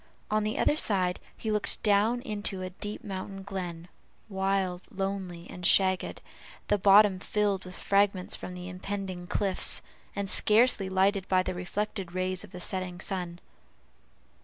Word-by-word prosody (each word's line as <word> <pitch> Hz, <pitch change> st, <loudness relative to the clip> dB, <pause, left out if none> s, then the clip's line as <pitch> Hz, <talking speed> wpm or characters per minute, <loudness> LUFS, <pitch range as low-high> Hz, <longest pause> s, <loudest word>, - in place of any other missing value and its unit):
On 215 Hz, 0 st, +2 dB
the 215 Hz, +1 st, -2 dB
other -, -, +3 dB
side 185 Hz, -8 st, +2 dB, 0.2 s
he 220 Hz, -, -3 dB
looked 210 Hz, -1 st, -2 dB
down 215 Hz, +4 st, +3 dB
into 205 Hz, -3 st, -1 dB
a 185 Hz, -, -5 dB
deep 205 Hz, +3 st, -6 dB
mountain 195 Hz, 0 st, -6 dB
glen, 180 Hz, -4 st, -5 dB, 0.4 s
wild, 190 Hz, -2 st, 0 dB
lonely, 195 Hz, -4 st, -4 dB
and 180 Hz, -, -10 dB
shagged, 185 Hz, +1 st, +2 dB, 0.5 s
the 205 Hz, -, +3 dB
bottom 200 Hz, 0 st, +6 dB
filled 200 Hz, -1 st, 0 dB
with 180 Hz, -1 st, -9 dB
fragments 200 Hz, -2 st, +1 dB
from 180 Hz, -, -7 dB
the 180 Hz, 0 st, -7 dB
impending 185 Hz, -1 st, -5 dB
cliffs, 195 Hz, -1 st, +2 dB, 0.3 s
and 200 Hz, -1 st, -2 dB
scarcely 215 Hz, -1 st, +4 dB
lighted 190 Hz, +1 st, +2 dB
by 185 Hz, -1 st, +3 dB
the -, -, -3 dB
reflected 185 Hz, 0 st, -4 dB
rays 185 Hz, 0 st, -1 dB
of 210 Hz, -, -11 dB
the 180 Hz, -, -8 dB
setting 185 Hz, 0 st, -4 dB
sun. 180 Hz, -3 st, -4 dB
190 Hz, 150 wpm, -29 LUFS, 185-205 Hz, 0.5 s, bottom